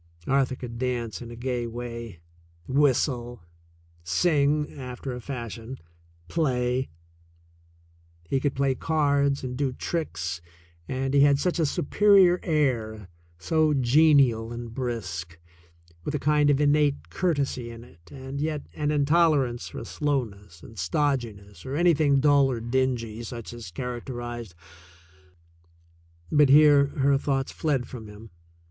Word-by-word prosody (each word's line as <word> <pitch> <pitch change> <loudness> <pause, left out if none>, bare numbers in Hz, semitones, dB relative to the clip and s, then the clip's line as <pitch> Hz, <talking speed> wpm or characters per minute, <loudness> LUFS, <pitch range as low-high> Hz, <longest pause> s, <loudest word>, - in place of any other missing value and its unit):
Arthur 135 -1 +1
could 120 -2 -8
dance 120 -3 -2
in 120 - -8
a 120 - -8
gay 120 0 -3
way, 115 -5 -7 0.5
whistle, 130 - +1 0.6
sing 150 - +1
after 125 0 -6
a 125 - -7
fashion, 120 -1 -6 0.5
play. 130 -5 0 1.3
He 110 +11 -1
could 140 0 -1
play 135 0 +1
cards 140 -1 +1
and 125 -1 -4
do 135 0 -1
tricks, 90 - -3 0.5
and 135 +1 -2
he 140 - +4
had 140 0 +5
such 175 +4 -1
a 160 - +2
superior 185 +4 +4
air, 115 - -1 0.3
so 155 - +1
genial 130 -4 +4
and 120 -1 -7
brisk, 90 -10 -4 0.7
with 150 - -3
a - - -1
kind 150 +1 +3
of 145 -1 +3
innate 145 -1 +2
courtesy 140 -8 -1
in 115 0 -10
it 85 -8 -19
and 135 0 -6
yet 155 -1 -2
an 150 -1 -2
intolerance 145 -4 +2
for - - -7
slowness 105 - -3
and 110 -3 -11
stodginess 105 - -2
or 130 +1 -5
any 175 +2 +4
thing 145 -2 +3
dull 140 -1 +4
or 125 -3 -2
dingy, 120 -2 -1
such 120 -1 -7
as 120 -5 -8
characterized 120 -1 -6 1.8
But 150 -2 +5
here 145 0 +7
her 140 -1 +1
thoughts 135 -2 -1
fled 135 -6 -1
from 115 -4 -9
him. 105 +1 -13
130 Hz, 130 wpm, -26 LUFS, 115-145 Hz, 1.8 s, here